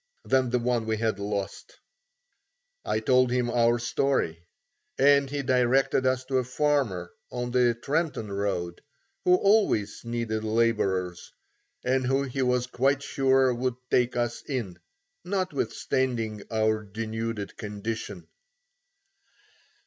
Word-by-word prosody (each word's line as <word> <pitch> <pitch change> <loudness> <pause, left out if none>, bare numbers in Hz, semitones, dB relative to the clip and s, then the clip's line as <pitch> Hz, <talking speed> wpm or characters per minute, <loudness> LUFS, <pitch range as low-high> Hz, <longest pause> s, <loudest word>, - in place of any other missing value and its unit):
than 130 -2 +2
the 125 - +2
one 120 -2 0
we 110 0 0
had 110 -2 -1
lost. 100 -1 -4 1.1
I 110 - 0
told 125 +2 +3
him 125 -1 0
our 120 0 +3
story, 120 -9 -1 0.5
and 140 0 +5
he 145 0 -3
directed 130 +1 +2
us 130 0 0
to 130 0 +1
a - - 0
farmer 125 -9 0 0.2
on 120 0 -3
the 120 -1 +3
Trenton 140 -4 -2
road 95 -4 -2 0.4
who 180 - +6
always 195 - +2
needed 115 -2 -2
labourers, 105 -6 0 0.5
and 130 0 +1
who 135 +2 +2
he 135 0 -3
was 125 -1 +2
quite 135 +3 +1
sure 135 -2 +3
would 125 0 -1 0.2
take 125 0 +2
us 120 -1 -1
in, 120 -10 -3 0.4
notwithstanding 130 - -1
our 110 -1 +1
denuded 110 0 -4
condition. 105 +1 -5
120 Hz, 120 wpm, -27 LUFS, 110-130 Hz, 1.1 s, who